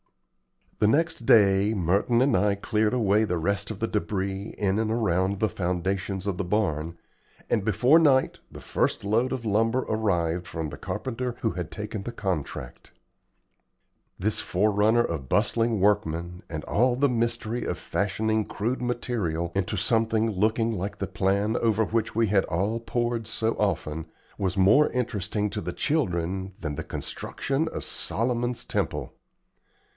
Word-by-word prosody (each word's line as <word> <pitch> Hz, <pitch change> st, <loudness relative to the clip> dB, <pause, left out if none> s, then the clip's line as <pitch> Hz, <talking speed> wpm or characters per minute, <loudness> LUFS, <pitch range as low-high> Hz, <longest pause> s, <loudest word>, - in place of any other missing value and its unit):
The 105 Hz, -, +4 dB
next 145 Hz, -2 st, +1 dB
day 100 Hz, 0 st, +5 dB
Merton 100 Hz, +7 st, +2 dB
and 140 Hz, -, +3 dB
I 100 Hz, +2 st, +3 dB
cleared 105 Hz, +2 st, 0 dB
away 105 Hz, -2 st, +3 dB
the 90 Hz, -5 st, 0 dB
rest 100 Hz, +5 st, -1 dB
of 110 Hz, -, -5 dB
the 115 Hz, -, -1 dB
debris 100 Hz, -1 st, -2 dB
in 100 Hz, 0 st, +1 dB
and 110 Hz, -1 st, 0 dB
around 100 Hz, -4 st, +1 dB
the 110 Hz, -, +2 dB
foundations 95 Hz, +1 st, -2 dB
of 100 Hz, -3 st, -1 dB
the 100 Hz, -, -1 dB
barn, 85 Hz, -4 st, -1 dB, 0.5 s
and 110 Hz, -, +2 dB
before 125 Hz, -, +5 dB
night 135 Hz, -5 st, +3 dB
the -, -, -10 dB
first -, -, 0 dB
load 115 Hz, +5 st, +1 dB
of 130 Hz, -3 st, -3 dB
lumber 115 Hz, +4 st, +2 dB
arrived 90 Hz, -6 st, 0 dB
from 80 Hz, -3 st, -4 dB
the -, -, -8 dB
carpenter 125 Hz, -1 st, -3 dB
who 110 Hz, -, +1 dB
had 90 Hz, -2 st, -5 dB
taken 105 Hz, +1 st, -5 dB
the 120 Hz, -, -5 dB
contract. 85 Hz, -, -4 dB, 1.3 s
This 105 Hz, +3 st, 0 dB
forerunner 105 Hz, +4 st, +2 dB
of 75 Hz, -, -4 dB
bustling 115 Hz, -2 st, +2 dB
workmen, 90 Hz, -3 st, 0 dB
and 80 Hz, -2 st, -5 dB
all 120 Hz, +3 st, +2 dB
the 140 Hz, +3 st, +3 dB
mystery 120 Hz, -1 st, -1 dB
of -, -, -2 dB
fashioning 110 Hz, +2 st, -1 dB
crude 120 Hz, +5 st, -2 dB
material 110 Hz, -9 st, -2 dB
into 95 Hz, -2 st, -1 dB
something 115 Hz, -2 st, +2 dB
looking 110 Hz, +3 st, +1 dB
like 100 Hz, 0 st, -4 dB
the 100 Hz, -, -2 dB
plan 100 Hz, +3 st, 0 dB
over 110 Hz, -1 st, +2 dB
which 115 Hz, +1 st, -1 dB
we 115 Hz, 0 st, +3 dB
had 100 Hz, -2 st, +3 dB
all 100 Hz, +7 st, -1 dB
pored 120 Hz, -1 st, -2 dB
so 115 Hz, 0 st, 0 dB
often, 80 Hz, -6 st, -1 dB, 0.3 s
was 95 Hz, -1 st, -1 dB
more 105 Hz, +11 st, +5 dB
interesting 105 Hz, -4 st, -1 dB
to -, -, -3 dB
the 90 Hz, +1 st, -4 dB
children 95 Hz, -, -1 dB
than 75 Hz, -6 st, -3 dB
the -, -, -4 dB
construction 140 Hz, +4 st, -3 dB
of -, -, -5 dB
Solomon's 120 Hz, +1 st, -1 dB
temple. -, -, -2 dB
105 Hz, 155 wpm, -26 LUFS, 95-115 Hz, 1.3 s, day